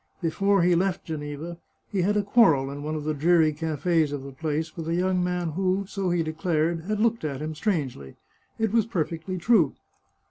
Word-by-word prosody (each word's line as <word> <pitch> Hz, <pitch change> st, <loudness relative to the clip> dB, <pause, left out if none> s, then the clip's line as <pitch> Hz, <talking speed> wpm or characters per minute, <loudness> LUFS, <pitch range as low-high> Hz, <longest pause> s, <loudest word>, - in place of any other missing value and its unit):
Before 195 Hz, +3 st, +2 dB
he 175 Hz, 0 st, +4 dB
left 185 Hz, +2 st, 0 dB
Geneva, 155 Hz, +2 st, -6 dB, 0.3 s
he 195 Hz, -3 st, 0 dB
had 205 Hz, +4 st, +2 dB
a 205 Hz, -, +2 dB
quarrel 165 Hz, -, +4 dB
in 145 Hz, +1 st, -6 dB
one 155 Hz, +1 st, -3 dB
of 150 Hz, -, -4 dB
the 155 Hz, +1 st, -1 dB
dreary 160 Hz, +1 st, +3 dB
cafes 160 Hz, 0 st, 0 dB
of 145 Hz, -2 st, -4 dB
the 140 Hz, -, -8 dB
place, 160 Hz, +2 st, -3 dB
with 165 Hz, -2 st, -6 dB
a 165 Hz, -, 0 dB
young 180 Hz, 0 st, +1 dB
man 180 Hz, -1 st, -1 dB
who, 190 Hz, +3 st, 0 dB
so 195 Hz, -2 st, -2 dB
he 175 Hz, -1 st, +1 dB
declared, 160 Hz, +1 st, -1 dB
had 210 Hz, +1 st, -1 dB
looked 230 Hz, -2 st, +1 dB
at 140 Hz, -4 st, -3 dB
him 155 Hz, +1 st, -4 dB
strangely. 145 Hz, -, -2 dB, 0.4 s
It 220 Hz, -2 st, 0 dB
was 225 Hz, -2 st, +3 dB
perfectly 170 Hz, -2 st, -3 dB
true. 180 Hz, -, +3 dB
165 Hz, 200 wpm, -26 LUFS, 155-190 Hz, 0.4 s, he